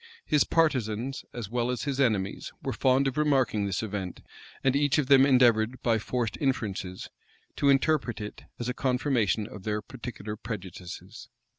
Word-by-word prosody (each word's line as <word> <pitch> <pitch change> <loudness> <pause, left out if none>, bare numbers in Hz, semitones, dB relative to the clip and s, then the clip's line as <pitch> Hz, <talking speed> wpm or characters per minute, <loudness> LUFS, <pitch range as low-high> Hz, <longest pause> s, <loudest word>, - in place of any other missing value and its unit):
His 150 -2 +4
partisans, 130 -6 0
as 120 -4 -5
well 120 0 0
as 125 - -2
his 140 -2 -2
enemies, 105 -7 0
were - - -2
fond 130 +1 +3
of 135 +2 -1
remarking 135 -8 +2
this 100 +3 -2
event; 100 -4 -5 0.4
and 135 0 +3
each 145 +1 +3
of 150 - +2
them 135 0 +7
endeavored, 120 -2 +4
by 115 -2 +3
forced 115 -1 -2
inferences, 100 -9 -2 0.5
to 140 - +3
interpret 135 -3 +2
it 105 0 -7
as 120 - -4
a 125 - -1
confirmation 125 -5 +1
of 105 - -9
their 105 +2 -1
particular 110 -2 -7
prejudices. 95 -6 -8
120 Hz, 160 wpm, -28 LUFS, 105-135 Hz, 0.5 s, them